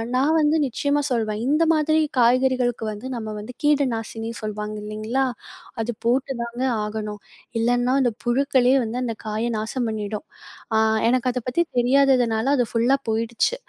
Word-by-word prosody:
நான் 295 Hz, +5 st, +3 dB
வந்து 300 Hz, +1 st, +3 dB
நிச்சயமா 285 Hz, +4 st, 0 dB
சொல்வேன். 220 Hz, -2 st, -1 dB
இந்த 305 Hz, +3 st, +3 dB
மாதிரி 310 Hz, 0 st, +2 dB, 0.2 s
காய்கறிகளுக்கு 245 Hz, -1 st, +2 dB
வந்து 215 Hz, +5 st, -7 dB
நம்ம 220 Hz, -2 st, -5 dB
வந்து 225 Hz, +4 st, -9 dB
கீடு 290 Hz, -2 st, +3 dB
நாசினி 225 Hz, 0 st, -5 dB
சொல்வாங்க 210 Hz, 0 st, -4 dB
இல்லேங்களா! 215 Hz, +5 st, -1 dB, 0.6 s
அது 235 Hz, +2 st, -2 dB
போட்டுதாங்க 245 Hz, -1 st, -1 dB, 0.2 s
ஆகணும். 210 Hz, -1 st, -5 dB, 0.4 s
இல்லன்னா, 245 Hz, +2 st, +2 dB
அந்த 245 Hz, -3 st, +1 dB
புழுக்களே 260 Hz, +1 st, +3 dB
வந்து 235 Hz, +3 st, -3 dB
அந்த 230 Hz, -, -3 dB
காயை 220 Hz, +3 st, -1 dB
நாசம் 230 Hz, +2 st, -2 dB
பண்ணிடும். 215 Hz, +3 st, -4 dB, 0.5 s
அ -, -, +4 dB, 0.3 s
எனக்கு 255 Hz, 0 st, +2 dB
அத 250 Hz, -, -2 dB
பத்தி 340 Hz, +7 st, +2 dB, 0.2 s
தெரியாததுனால 250 Hz, -3 st, +3 dB
அது 245 Hz, -, +2 dB
ஃபுல்லா 240 Hz, +4 st, +3 dB
போயிடுச்சு. 230 Hz, -, 0 dB
240 Hz, 145 wpm, -23 LUFS, 220-265 Hz, 0.6 s, அ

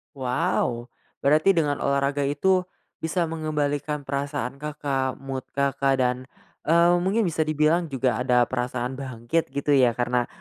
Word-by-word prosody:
Wow, 125 Hz, -3 st, -1 dB, 0.3 s
berarti 155 Hz, +7 st, +4 dB
dengan 150 Hz, -4 st, +1 dB
olahraga 140 Hz, 0 st, 0 dB
itu, 180 Hz, +6 st, +1 dB, 0.3 s
bisa 165 Hz, +2 st, -1 dB
mengembalikan 150 Hz, -2 st, -2 dB
perasaan 140 Hz, -1 st, -3 dB
Kakak, 140 Hz, -3 st, -2 dB
mood 135 Hz, -1 st, -5 dB
Kakak, 140 Hz, 0 st, +1 dB
dan, 125 Hz, 0 st, +1 dB, 0.5 s
eee, 170 Hz, +2 st, +5 dB
mungkin 195 Hz, +6 st, +1 dB
bisa 160 Hz, -5 st, 0 dB
dibilang 155 Hz, +3 st, +2 dB
juga 130 Hz, -5 st, 0 dB
ada 125 Hz, -1 st, +3 dB
perasaan 125 Hz, +1 st, -3 dB
bangkit 130 Hz, +4 st, -2 dB
gitu 140 Hz, +1 st, -1 dB
ya, 130 Hz, -4 st, +4 dB
karena 120 Hz, 0 st, 0 dB
140 Hz, 135 wpm, -25 LUFS, 130-155 Hz, 0.5 s, eee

